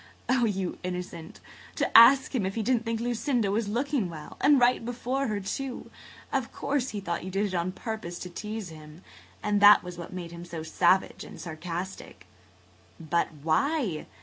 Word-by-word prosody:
Oh, 250 -2 +3
you 195 -4 -2
innocent! 180 -2 -6 0.4
To - - -1
ask 260 +5 +8
him 245 -6 0
if 190 +1 -2
he 225 - -1
didn't 240 0 +1
think 230 0 -1
Lucinda 235 -2 0
was 215 +1 0
looking 245 -1 -1
well! 155 -3 -9
And 290 -2 +6
right 245 -1 +3
before 250 +3 -2
her, 210 -2 -1
too! 255 +6 -5 0.4
Of 265 -4 -1
course 275 -2 -1
he 210 - -4
thought 170 -4 -3
you 185 - -5
did 195 +2 0
it 195 - -4
on 175 +1 -1
purpose 215 -5 -5
to 180 - -6
tease 210 +1 -5
him. 155 +1 -13 0.4
That 205 0 +6
was 180 -1 -8
what 170 - -7
made 175 -2 -6
him 170 0 -9
so 170 -2 -6
savage 175 +4 +2
and - - -11
sarcastic." 170 - -6 0.7
"But 165 +1 0 0.2
why? 195 - 0
200 Hz, 175 wpm, -28 LUFS, 175-240 Hz, 0.7 s, ask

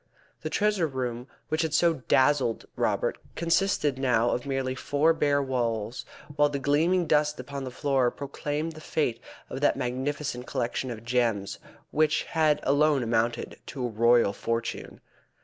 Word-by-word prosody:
The - - -3
treasure 210 -5 +1
room 125 -3 -4 0.2
which 155 +1 +1
had 160 -1 0
so 170 0 +4
dazzled 130 -4 +3
Robert - - 0 0.2
consisted 165 -5 +1
now 120 -3 +2
of 125 +3 -2
merely 135 -1 -1
four 145 +4 +2
bare 145 -3 +2
walls, 120 -3 -2 0.3
while 145 0 +4
the 145 - -2
gleaming 160 +6 +2
dust 150 -1 +2
upon 140 -1 -6
the - - -4
floor 135 -1 +1
proclaimed 145 +4 -4
the 155 -1 -11
fate 125 -8 -1 0.3
of 135 - -6
that 145 - +3
magnificent 130 0 -3
collection 125 +1 -2
of 115 -1 -7
gems 115 -5 0 0.3
which 155 0 +2
had 155 -2 +2
alone 145 -1 +3
amounted 115 0 -1
to 130 -3 -4
a - - -1
royal 115 -1 +4
fortune. 115 +2 -4
135 Hz, 150 wpm, -27 LUFS, 120-150 Hz, 0.3 s, so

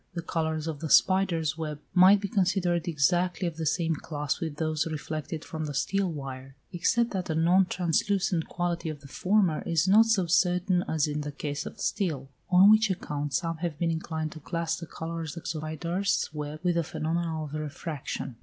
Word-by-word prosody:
The 170 - -3
colours 160 -2 -2
of 160 -3 -4
the 160 - -4
spider's 170 -5 +3
web 150 -2 -4
might 190 +2 +7
be 200 - -3
considered 180 -3 +1
exactly 175 +4 +1
of 165 -2 -5
the 160 -1 -2
same 165 +1 +1
class 145 -2 -3
with 160 -3 -4
those 155 0 -1
reflected 155 +1 -5
from 160 -1 -4
the 145 -2 -5
steel 195 +6 0
wire, 135 -2 -7 0.2
except 230 +7 +1
that 185 -3 -2
the 160 - -2
non 175 +4 +4
translucent 180 0 0
quality 175 -2 -2
of 150 -2 -6
the 140 - -12
former 185 +2 +1
is 165 +1 +1
not 220 +4 +6
so 210 -5 +2
certain 180 +1 +2
as 155 -2 +1
in 150 0 -2
the 145 0 -4
case 145 0 -4
of - - -10
steel; 145 -9 -2 0.2
on 190 +3 +7
which 215 0 +5
account 145 -6 -3
some 165 +1 -1
have 165 -2 -3
been 165 +1 0
inclined 160 -1 -3
to 155 - -9
class 165 +1 -2
the 170 - -8
colours 165 -1 -5
of 170 - -7
the - - -4
spider's 165 +5 -1
web 150 0 -5
with 180 -1 +2
the 170 0 +1
phenomena 160 0 -2
of 150 -1 -8
refraction. 145 -4 -5
165 Hz, 195 wpm, -28 LUFS, 155-180 Hz, 0.2 s, might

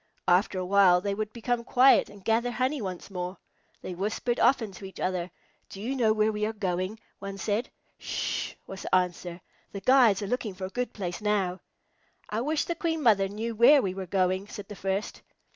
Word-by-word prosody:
After 185 +2 +3
a 185 - -2
while 185 -2 +5
they 200 +2 -2
would 215 +1 -3
become 235 +1 -2
quiet 255 +2 +5
and 200 -2 -15
gather 230 +2 +2
honey 255 +4 -1
once 185 -1 -6
more. 180 0 -4 0.5
They 185 - -5
whispered 215 +6 -2
often 230 -6 +3
to 195 +1 -10
each 190 - -10
other. 185 -1 -1 0.4
"Do 195 - -9
you 245 +7 -3
know 230 -4 +3
where 215 0 +2
we 210 0 -3
are 220 - -3
going?" 190 0 -2 0.2
one 195 0 -6
said. 210 +5 -1 0.3
"Sh!" - - -3
was 195 0 -8
the - - +1
answer. 180 -1 -1 0.3
"The 200 - -5
guides 235 -4 +5
are - - -3
looking 220 -4 -2
for 185 0 -5
a - - -5
good 245 +5 -3
place 180 -3 -5
now." 195 -3 0 0.7
"I 215 +2 -1
wish 300 +4 0
the 340 - -1
Queen 325 -2 -2
Mother 200 -5 +4
knew 220 +4 -4
where 240 +7 +7
we 190 -2 -1
are 190 -1 -6
going," 185 +1 0
said 205 -1 -9
the 205 - -7
first. 195 +2 -3
205 Hz, 205 wpm, -28 LUFS, 185-235 Hz, 0.7 s, where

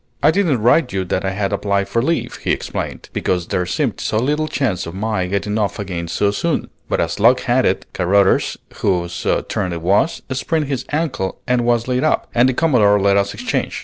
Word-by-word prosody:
"I - - +6
didn't 160 - +1
write 125 +3 +4
you 95 -1 -1
that 95 +2 -1
I 95 - 0
had 100 +1 -2
applied 100 -1 0
for 115 - 0
leave," 165 +7 -1
he - - -2
explained, - - -4
"because 90 -2 -1
there 90 -1 -1
seemed - - -1
so 110 - -1
little 150 +6 0
chance 125 - -1
of 85 - -7
my 105 -2 -1
getting 100 +3 -1
off 105 -2 -1
again 90 -4 -4
so 100 +4 +1
soon; 100 - -2 0.2
but - - 0
as 85 +3 -1
luck 120 +4 +5
had 130 0 +2
it, 95 - -1
Carruthers, 95 +2 +2 0.2
whose 85 -3 -1 0.2
turn 90 - -2
it 85 -1 -4
was, 100 - +1
sprained 150 +4 -1
his 135 -3 -3
ankle 145 - -2
and 125 -1 +1
was 120 -1 +1
laid 125 0 0
up, 155 - +1
and 120 +2 +4
the - - 0
Commodore 115 -11 +4
let 100 0 +3
us 100 0 +1
exchange. - - -2
105 Hz, 210 wpm, -19 LUFS, 95-130 Hz, 0.2 s, I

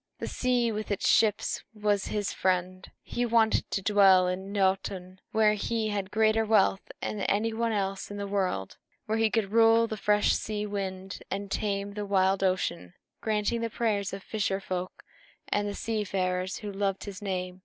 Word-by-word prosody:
The - - -4
sea 245 -2 +1
with 215 0 -4
its 200 - 0
ships 210 -2 +2
was 210 -2 0
his 205 -2 -2
friend, 185 0 -1
and - - -18
he 245 - -2
wanted 230 -2 +2
to 195 - -2
dwell 190 -2 +5
in 190 +2 -3
Noatûn, 190 -2 -1
where 215 -1 +4
he 220 +1 -1
had 200 -2 -2
greater 220 +1 +3
wealth 210 -3 +2
than 210 - -3
any 215 +3 0
one 230 +1 0
else 195 -2 -2
in 205 - -6
the 200 - -3
world, 190 - -2 0.3
where 220 +1 -1
he 225 0 +3
could 205 -1 -1
rule 225 0 +5
the 220 -1 -5
fresh 210 +1 +3
sea 210 -1 -2
wind 195 -2 -5
and 200 0 -4
tame 200 -1 -2
the 210 0 -4
wild 195 -1 +2
ocean, 90 - -1 0.3
granting 215 +1 0
the 230 - -1
prayers 210 -4 -1
of 195 0 -7
fisher 195 -3 -1
folk 185 -1 -5 0.5
and 205 0 0
the 205 - -4
seafarers, 190 -4 -1
who 210 -1 -6
loved 195 -1 -1
his 200 -2 -8
name. 185 -2 -3
200 Hz, 180 wpm, -28 LUFS, 190-215 Hz, 0.5 s, dwell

